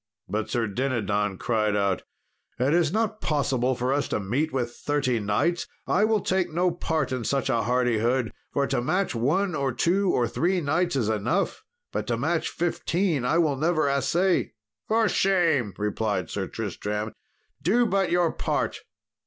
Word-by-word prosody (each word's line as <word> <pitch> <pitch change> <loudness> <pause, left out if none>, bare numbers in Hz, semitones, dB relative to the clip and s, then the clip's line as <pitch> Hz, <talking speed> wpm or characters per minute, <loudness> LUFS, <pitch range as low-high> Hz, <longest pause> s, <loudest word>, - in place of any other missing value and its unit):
But 110 0 -2
Sir 120 -3 0
Dinadan 105 -4 -1
cried 110 -2 0
out, 100 -2 +1 0.6
"It 130 +4 +2
is 165 -3 +3
not 215 +1 -1
possible 130 -4 +1
for 125 +2 0
us 145 0 0
to - - -1
meet 130 +11 -1
with 120 -3 -2
thirty 140 -5 0
knights! 140 +12 0 0.2
I 210 - +3
will 215 -2 +2
take 185 -1 0
no 175 +3 +2
part 160 -5 -1
in 130 -2 -2
such 135 +2 0
a 115 -2 +2
hardihood, 120 0 +1 0.2
for 140 - +1
to 120 - 0
match 185 +9 0
one 155 +11 +1
or 140 -3 0
two 180 +10 +1
or 120 -8 +2
three 180 +7 +1
knights 170 +2 0
is 120 -6 +1
enough; 110 - 0 0.3
but - - -3
to - - 0
match - - 0
fifteen 170 -3 0
I 160 - +2
will 155 -5 +2
never 155 0 +2
assay." 170 +7 +1 0.3
"For 225 0 +3
shame," 170 - +2
replied 105 -3 -1
Sir - - -2
Tristram, 105 +1 -4 0.5
"do 235 +7 +3
but 195 -3 +1
your 175 -1 +2
part." - - -2
140 Hz, 165 wpm, -26 LUFS, 120-175 Hz, 0.6 s, is